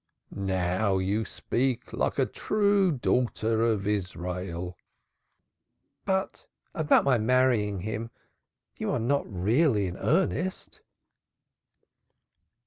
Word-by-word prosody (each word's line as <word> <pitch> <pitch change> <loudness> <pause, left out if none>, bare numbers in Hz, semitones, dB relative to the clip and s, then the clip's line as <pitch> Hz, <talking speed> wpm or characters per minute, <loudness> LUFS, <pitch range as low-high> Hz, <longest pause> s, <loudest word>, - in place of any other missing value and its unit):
"Now 95 +1 0
you 100 +4 0
speak 125 -1 -2
like - - -1
a - - +3
true 200 -3 +2
daughter 120 -4 0
of 110 -4 +1
Israel." 90 -3 -3 1.3
"But 190 -1 -2 0.3
about 155 -2 +3
my 130 -4 +3
marrying 110 -4 +2
him 110 +3 -4 0.7
you - - -3
are - - 0
not 135 +2 0
really 105 - +2
in 90 0 -5
earnest?" 180 - -1
110 Hz, 95 wpm, -27 LUFS, 95-135 Hz, 1.3 s, a